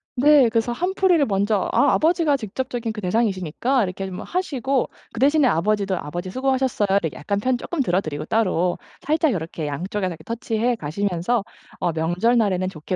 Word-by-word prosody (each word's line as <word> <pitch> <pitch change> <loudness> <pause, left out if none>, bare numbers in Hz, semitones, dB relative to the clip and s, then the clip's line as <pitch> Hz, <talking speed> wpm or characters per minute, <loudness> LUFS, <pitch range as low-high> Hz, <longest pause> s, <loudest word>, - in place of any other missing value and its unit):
네, 275 -2 +6
그래서 230 +1 0
한풀이를 360 0 +2
먼저 200 -1 +1
아 285 - +4
아버지가 320 -2 +3
직접적인 245 0 -4
그 215 - -7
대상이시니까 210 - 0
이렇게 190 0 -4
좀 185 -1 -6
하시고 275 -7 -1 0.2
그 230 - -6
대신에 285 0 +4
아버지도 200 +1 +1
"아버지 175 +5 -5
수고하셨어요." 260 -2 0
이렇게 160 -3 -3
약간 200 +7 -2
편 255 +4 +1
조금 340 +6 -5
들어드리고 175 - -1
따로 180 -4 +1 0.2
살짝 310 0 +1
요렇게 165 -4 -4
양쪽에서 185 +5 -3
touch 230 +1 -3
해 245 0 +2
가시면서 195 +5 -1 0.3
어 170 - 0
명절날에는 185 +4 +1
좋게 170 +1 -5
220 Hz, 425 characters per minute, -22 LUFS, 185-260 Hz, 0.3 s, 네